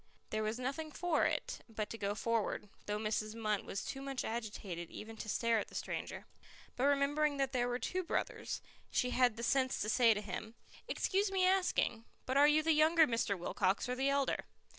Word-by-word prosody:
There 215 Hz, -, 0 dB
was 215 Hz, +2 st, -1 dB
nothing 275 Hz, +5 st, -3 dB
for 340 Hz, 0 st, +1 dB
it -, -, -3 dB
but 215 Hz, -1 st, -4 dB
to -, -, -4 dB
go 200 Hz, 0 st, -1 dB
forward, 220 Hz, -2 st, -1 dB, 0.2 s
though 210 Hz, 0 st, 0 dB
Mrs. 215 Hz, 0 st, -2 dB
Munt 215 Hz, -3 st, -1 dB
was 195 Hz, -, -4 dB
too 270 Hz, -, -5 dB
much 275 Hz, -1 st, -3 dB
agitated 205 Hz, -7 st, -4 dB
even 225 Hz, +1 st, -8 dB
to 215 Hz, -, -6 dB
stare 230 Hz, +1 st, +2 dB
at -, -, -4 dB
the -, -, -14 dB
stranger. -, -, -4 dB, 0.5 s
But 255 Hz, -, +1 dB
remembering 285 Hz, +1 st, +2 dB
that 270 Hz, -1 st, 0 dB
there 245 Hz, -2 st, +1 dB
were 245 Hz, 0 st, 0 dB
two 365 Hz, +9 st, -2 dB
brothers, 350 Hz, -, -3 dB, 0.3 s
she 250 Hz, -, +1 dB
had 250 Hz, -3 st, +3 dB
the 235 Hz, -, -5 dB
sense 260 Hz, +1 st, +2 dB
to 210 Hz, -, -1 dB
say 230 Hz, -1 st, +5 dB
to 210 Hz, -, -2 dB
him, 215 Hz, +3 st, -6 dB, 0.3 s
"Excuse 395 Hz, +1 st, +1 dB
me 375 Hz, -1 st, +3 dB
asking, 365 Hz, -11 st, +2 dB, 0.2 s
but 260 Hz, -, -1 dB
are 285 Hz, +1 st, +7 dB
you 305 Hz, +1 st, +4 dB
the 325 Hz, -, +3 dB
younger 315 Hz, +2 st, +6 dB
Mr. 230 Hz, -6 st, 0 dB
Wilcox 190 Hz, +4 st, 0 dB
or 250 Hz, -, -1 dB
the 265 Hz, +2 st, +1 dB
elder?" 280 Hz, -1 st, +1 dB
245 Hz, 205 wpm, -35 LUFS, 215-280 Hz, 0.5 s, are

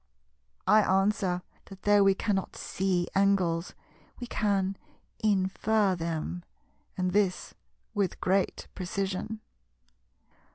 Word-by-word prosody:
I 215 Hz, 0 st, +6 dB
answer 195 Hz, -2 st, +1 dB, 0.2 s
that 195 Hz, -1 st, -13 dB
though 205 Hz, -1 st, +5 dB
we 195 Hz, -1 st, +5 dB
cannot 195 Hz, -2 st, -1 dB
see 185 Hz, -2 st, -1 dB
angles, 190 Hz, -4 st, +2 dB, 0.4 s
we 245 Hz, -, -4 dB
can 200 Hz, -4 st, 0 dB, 0.5 s
infer 205 Hz, 0 st, +2 dB
them, 170 Hz, +1 st, -3 dB, 0.5 s
and 185 Hz, -1 st, 0 dB
this 195 Hz, -2 st, 0 dB, 0.4 s
with 200 Hz, -4 st, -1 dB
great 190 Hz, +1 st, 0 dB
precision. 195 Hz, +3 st, -3 dB
195 Hz, 95 wpm, -29 LUFS, 185-205 Hz, 0.5 s, I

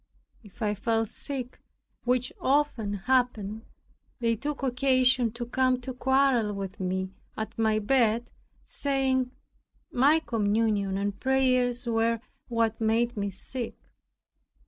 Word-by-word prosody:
If 210 Hz, 0 st, -10 dB
I 210 Hz, -1 st, +1 dB
fell 225 Hz, +2 st, 0 dB
sick, 255 Hz, +2 st, -6 dB, 0.4 s
which 250 Hz, 0 st, +1 dB
often 265 Hz, -7 st, +1 dB
happened, 220 Hz, -1 st, 0 dB, 0.6 s
they 230 Hz, -1 st, +2 dB
took 290 Hz, +5 st, -4 dB
occasion 255 Hz, -2 st, +3 dB
to 240 Hz, 0 st, -5 dB
come 255 Hz, +1 st, +2 dB
to 260 Hz, +1 st, -5 dB
quarrel 265 Hz, -4 st, +2 dB
with 195 Hz, -1 st, -6 dB
me 185 Hz, 0 st, -2 dB, 0.3 s
at 220 Hz, -, -4 dB
my 220 Hz, -1 st, +3 dB
bed, 230 Hz, +1 st, +2 dB, 0.3 s
saying, 265 Hz, -2 st, 0 dB, 0.6 s
my 280 Hz, +5 st, +5 dB
communion 210 Hz, -6 st, 0 dB
and 200 Hz, 0 st, -2 dB
prayers 255 Hz, -2 st, +2 dB
were 230 Hz, 0 st, +1 dB, 0.3 s
what 230 Hz, -2 st, 0 dB
made 230 Hz, +2 st, +2 dB
me 200 Hz, -1 st, -1 dB
sick. 235 Hz, +5 st, -4 dB
235 Hz, 120 wpm, -28 LUFS, 215-260 Hz, 0.6 s, my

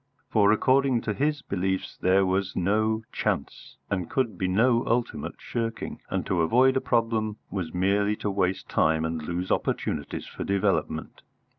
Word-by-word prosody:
For 105 Hz, -1 st, +5 dB
according 130 Hz, +2 st, +3 dB
to 105 Hz, -, -2 dB
his 145 Hz, +4 st, 0 dB
beliefs 95 Hz, 0 st, -2 dB
there 95 Hz, +1 st, +3 dB
was 95 Hz, +1 st, 0 dB
no 110 Hz, +4 st, +1 dB
Chance, -, -, -3 dB
and 90 Hz, -4 st, -2 dB
could 130 Hz, -5 st, 0 dB
be 95 Hz, -, -1 dB
no 115 Hz, +5 st, +3 dB
ultimate 120 Hz, 0 st, -1 dB
shirking, 115 Hz, -1 st, -4 dB
and -, -, -2 dB
to 90 Hz, -3 st, +1 dB
avoid 130 Hz, +10 st, +4 dB
a 130 Hz, -, +2 dB
problem 115 Hz, -3 st, 0 dB
was 90 Hz, -5 st, -3 dB
merely 100 Hz, +3 st, +1 dB
to 105 Hz, -, -3 dB
waste 95 Hz, -1 st, -1 dB
time 80 Hz, 0 st, +2 dB
and 80 Hz, 0 st, -2 dB
lose 85 Hz, +4 st, -3 dB
opportunities -, -, -1 dB
for -, -, -6 dB
development. 95 Hz, -4 st, -1 dB
100 Hz, 155 wpm, -26 LUFS, 95-115 Hz, -, For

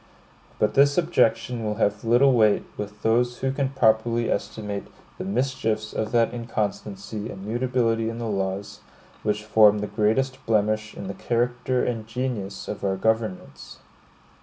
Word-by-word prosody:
But 105 Hz, 0 st, +1 dB
this 140 Hz, +1 st, +4 dB
objection 125 Hz, -8 st, +1 dB
will 105 Hz, -1 st, -1 dB
have 105 Hz, -1 st, 0 dB
little 120 Hz, +4 st, +5 dB
weight 110 Hz, -4 st, +4 dB
with 105 Hz, 0 st, -7 dB
those 120 Hz, +2 st, +2 dB
who 135 Hz, 0 st, -1 dB
can 135 Hz, 0 st, -1 dB
properly 115 Hz, -2 st, +2 dB
estimate 105 Hz, -2 st, -3 dB, 0.3 s
the -, -, -3 dB
mischiefs 110 Hz, 0 st, -1 dB
of 110 Hz, 0 st, -2 dB
that 115 Hz, 0 st, +2 dB
inconstancy 105 Hz, -2 st, -4 dB
and 95 Hz, 0 st, -8 dB
mutability 115 Hz, -1 st, 0 dB
in 115 Hz, -, -5 dB
the 120 Hz, -, -4 dB
laws, 100 Hz, -1 st, -3 dB, 0.4 s
which 105 Hz, 0 st, -1 dB
form 105 Hz, -1 st, +5 dB
the 105 Hz, -, -2 dB
greatest 120 Hz, +6 st, 0 dB
blemish 110 Hz, 0 st, +1 dB
in -, -, -7 dB
the 100 Hz, -, -4 dB
character 120 Hz, +4 st, 0 dB
and 115 Hz, -3 st, -3 dB
genius 115 Hz, -5 st, -4 dB
of 105 Hz, -, -5 dB
our 95 Hz, -1 st, 0 dB
governments. 110 Hz, -9 st, -2 dB
110 Hz, 150 wpm, -25 LUFS, 105-120 Hz, 0.4 s, little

